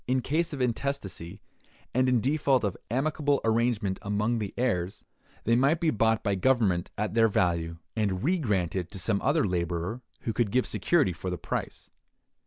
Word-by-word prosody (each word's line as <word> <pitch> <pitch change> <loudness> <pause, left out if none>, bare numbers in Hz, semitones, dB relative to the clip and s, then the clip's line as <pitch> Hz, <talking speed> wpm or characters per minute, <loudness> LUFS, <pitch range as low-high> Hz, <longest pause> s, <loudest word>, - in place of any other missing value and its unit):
In 130 +1 +2
case 160 +6 0
of 140 -3 -4
intestacy, 110 -7 -3 0.5
and 130 +1 +3
in 125 -3 +3
default 135 -1 +2
of 100 -4 -1
amicable 145 +3 +1
arrangement 110 -4 +1
among 105 +3 0
the 105 -3 -3
heirs, 95 -8 -1 0.4
they 115 - +3
might 140 +7 +3
be 165 -2 +2
bought 110 0 +2
by 100 - +1
government 100 -5 +2
at 105 0 -1
their 115 0 +5
value, 85 -4 0 0.2
and 100 -4 0
re 180 +4 +2
granted 95 - -1
to - - -8
some 100 +1 0
other 145 +1 +2
laborer 85 +4 -2 0.2
who 115 - -2
could 110 0 +1
give 125 +5 +2
security 150 - +2
for 90 +3 -5
the 90 - -3
price. - - -5
115 Hz, 175 wpm, -28 LUFS, 95-130 Hz, 0.5 s, their